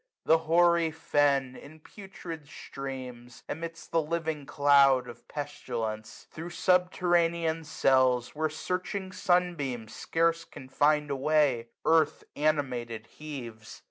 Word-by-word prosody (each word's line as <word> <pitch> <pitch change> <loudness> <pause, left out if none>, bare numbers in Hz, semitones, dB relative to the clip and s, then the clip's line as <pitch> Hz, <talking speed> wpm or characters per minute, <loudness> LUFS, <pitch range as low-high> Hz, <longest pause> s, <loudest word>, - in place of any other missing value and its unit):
The 160 0 +5
hoary 170 0 +4
fen. 140 -4 +1
In 155 +4 -13
putrid 170 -4 -10
steams, 130 -4 -8
emits 165 +1 -6
the 165 - +1
living 160 -2 -3
cloud 140 -3 +4
Of 120 -1 -12
pestilence. 120 -7 -5
Thro' 165 +2 -7
subterranean 170 -2 +1
cells. 130 -4 +2
Where 155 +1 -1
searching 185 +4 -4
sun 180 -1 +2
beams 125 -8 -5
scarce 165 0 0
can 130 - -12
find 150 +1 +2
a - - 0
way, 135 -4 +2 0.2
295 165 0 +6
Earth 150 - -5
animated 125 -7 -1
heaves. 120 -8 -8
150 Hz, 120 wpm, -29 LUFS, 130-165 Hz, 0.2 s, 295